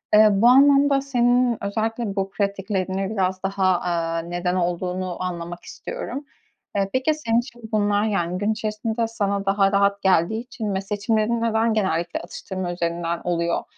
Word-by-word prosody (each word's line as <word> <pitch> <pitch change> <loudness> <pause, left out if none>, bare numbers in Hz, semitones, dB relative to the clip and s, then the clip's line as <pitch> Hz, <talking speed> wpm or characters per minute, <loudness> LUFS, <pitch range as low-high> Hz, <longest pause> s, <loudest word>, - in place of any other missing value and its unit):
Iıı, 215 0 +8
bu 235 - +6
anlamda 275 +2 +6
senin 245 -2 +2
özellikle 220 +1 -2
bu 195 0 -1
pratiklerini 195 -1 -2
biraz 190 -3 -1
daha, 190 -2 +1
aaa, 165 -1 -1
neden 175 +2 -2
olduğunu 180 +1 -2
anlamak 175 -1 -5
istiyorum. 275 +4 -6 0.5
Iıı, 195 -1 +1
peki 260 +4 +2
senin 235 -7 +1
için 240 -1 -8
bunlar, 205 -1 +2
yani, 180 -4 -1
gün 205 +3 0
içerisinde 220 +2 -2
sana 200 -3 -2
daha 195 0 +3
rahat 200 0 +2
geldiği 190 +3 +2
için 220 -5 -4
ve 190 - -1
seçimlerin 215 +3 0
neden 225 0 +2
genellikle 175 -5 0
atıştırma 180 +1 -5
üzerinden 170 -1 -2
oluyor? 170 -1 0
200 Hz, 150 wpm, -23 LUFS, 180-225 Hz, 0.5 s, Iıı